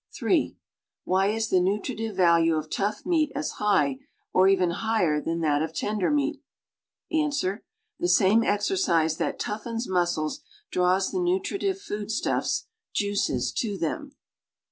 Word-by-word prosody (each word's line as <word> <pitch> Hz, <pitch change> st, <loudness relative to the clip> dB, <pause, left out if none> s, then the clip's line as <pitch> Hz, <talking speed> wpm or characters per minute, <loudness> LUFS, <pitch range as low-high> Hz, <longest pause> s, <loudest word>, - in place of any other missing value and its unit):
(3) -, -, +1 dB, 0.5 s
Why 190 Hz, +1 st, +2 dB
is 220 Hz, +1 st, -1 dB
the 185 Hz, -, +4 dB
nutritive 210 Hz, +3 st, -1 dB
value 170 Hz, -3 st, +4 dB
of 155 Hz, 0 st, -4 dB
tough 205 Hz, +2 st, -2 dB
meat 320 Hz, -5 st, +2 dB
as 290 Hz, +2 st, -3 dB
high, 145 Hz, -10 st, +2 dB, 0.3 s
or 185 Hz, +1 st, +5 dB
even 185 Hz, -3 st, +3 dB
higher, 180 Hz, -6 st, +1 dB
than 165 Hz, +2 st, -2 dB
that 150 Hz, -2 st, +2 dB
of 160 Hz, 0 st, -3 dB
tender 210 Hz, 0 st, 0 dB
meat.^ 295 Hz, 0 st, 0 dB, 0.7 s
Ans. 300 Hz, -2 st, +1 dB, 0.6 s
The 350 Hz, -, 0 dB
same 220 Hz, -, +5 dB
exercise 205 Hz, -, +1 dB
that -, -, -2 dB
toughens 225 Hz, +3 st, -3 dB
muscles 175 Hz, -, 0 dB, 0.3 s
draws 185 Hz, +1 st, +2 dB
the 370 Hz, -, -1 dB
nutri 375 Hz, +3 st, 0 dB
tive 390 Hz, -1 st, -1 dB
foodstuffs 215 Hz, -, -2 dB, 0.3 s
(juices) 200 Hz, -, 0 dB
to 205 Hz, -4 st, -1 dB
them. 275 Hz, -, -4 dB
205 Hz, 140 wpm, -26 LUFS, 175-275 Hz, 0.7 s, or